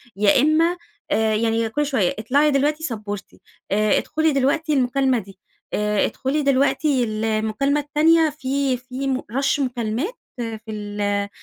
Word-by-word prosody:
يا 205 Hz, +4 st, +4 dB
إما 325 Hz, +4 st, +3 dB, 0.3 s
آآ 220 Hz, 0 st, +2 dB
يعني 225 Hz, +1 st, 0 dB
كل 295 Hz, +7 st, -1 dB
شويّة 245 Hz, -11 st, 0 dB
اطلعي 285 Hz, +7 st, +2 dB
دلوقتِ 295 Hz, +3 st, +1 dB
سَبّورتي 210 Hz, -8 st, -6 dB, 0.3 s
آآ 210 Hz, 0 st, +3 dB
ادخلي 315 Hz, 0 st, 0 dB
دلوقتِ 280 Hz, +4 st, 0 dB
المكالمة 265 Hz, -2 st, +2 dB
دي، 195 Hz, -2 st, -13 dB, 0.3 s
آآ 210 Hz, -1 st, +1 dB
ادخلي 275 Hz, +3 st, -1 dB
دلوقتِ 275 Hz, +2 st, +2 dB
المكالمة 225 Hz, +1 st, 0 dB
التانية 315 Hz, +2 st, +3 dB
في 275 Hz, -3 st, -1 dB
في 255 Hz, +2 st, -5 dB
م 265 Hz, -1 st, 0 dB
rush 270 Hz, +5 st, -1 dB
مكالمات 250 Hz, -, -2 dB, 0.2 s
في 225 Hz, -2 st, -4 dB
ال 205 Hz, -1 st, -2 dB
255 Hz, 135 wpm, -22 LUFS, 215-290 Hz, 0.3 s, يا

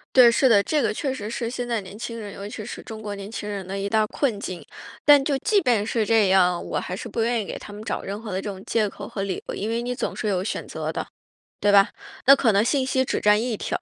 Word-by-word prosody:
对， 250 Hz, -2 st, +9 dB
是 250 Hz, +3 st, +3 dB
的。 215 Hz, -5 st, +6 dB
这 300 Hz, +6 st, 0 dB
个 -, -, +1 dB
确 270 Hz, +6 st, -2 dB
实 220 Hz, -5 st, -5 dB
是 230 Hz, 0 st, -3 dB
现 245 Hz, 0 st, -4 dB
在 235 Hz, -2 st, -1 dB
年 195 Hz, +1 st, -11 dB
轻 230 Hz, 0 st, -5 dB
人 205 Hz, -2 st, -7 dB
尤 200 Hz, -, -7 dB
其 215 Hz, +1 st, -7 dB
是 -, -, -7 dB
中 220 Hz, -1 st, -8 dB
国 210 Hz, -1 st, -5 dB
年 200 Hz, +1 st, -8 dB
轻 210 Hz, -, -5 dB
人 200 Hz, -3 st, -5 dB
的 195 Hz, +1 st, -4 dB
一 200 Hz, 0 st, -2 dB
大 215 Hz, +1 st, +2 dB
困 240 Hz, -5 st, -1 dB
境。 185 Hz, -3 st, -6 dB, 0.4 s
但 290 Hz, -1 st, +8 dB
就 275 Hz, -1 st, 0 dB
即 415 Hz, -, +2 dB
便 235 Hz, -8 st, +2 dB
是 225 Hz, -1 st, 0 dB
这 220 Hz, -2 st, +4 dB
样， 180 Hz, -2 st, +3 dB
我 -, -, -2 dB
还 180 Hz, -, -4 dB
是 220 Hz, +5 st, -6 dB
不 230 Hz, +1 st, -2 dB
愿 235 Hz, 0 st, +1 dB
意 -, -, -8 dB
给 -, -, -5 dB
他 210 Hz, -, -11 dB
们 205 Hz, +1 st, -8 dB
找 -, -, -3 dB
任 200 Hz, +2 st, -5 dB
何 225 Hz, -2 st, -7 dB
的 185 Hz, -, -2 dB
这 205 Hz, -, -4 dB
种 190 Hz, -1 st, -8 dB
借 220 Hz, -2 st, +1 dB
口 -, -, -9 dB
和 195 Hz, -, -4 dB
理 195 Hz, -2 st, -3 dB
由。 -, -, -3 dB
因 210 Hz, +3 st, -3 dB
为 230 Hz, +1 st, 0 dB
你 245 Hz, +1 st, -3 dB
总 -, -, -3 dB
是 -, -, -4 dB
有 185 Hz, -2 st, 0 dB
选 -, -, -4 dB
择 -, -, -4 dB
的， -, -, -4 dB, 0.5 s
对 205 Hz, 0 st, +3 dB
吧？ 200 Hz, 0 st, +7 dB, 0.4 s
那 275 Hz, -, +9 dB
可 245 Hz, -5 st, +3 dB
能 200 Hz, +1 st, +4 dB
信 260 Hz, +2 st, +1 dB
息 260 Hz, 0 st, +1 dB
只 -, -, -1 dB
占 210 Hz, +1 st, +4 dB
一 235 Hz, -2 st, -2 dB
条， -, -, -2 dB
215 Hz, 315 characters per minute, -24 LUFS, 200-240 Hz, 0.5 s, 对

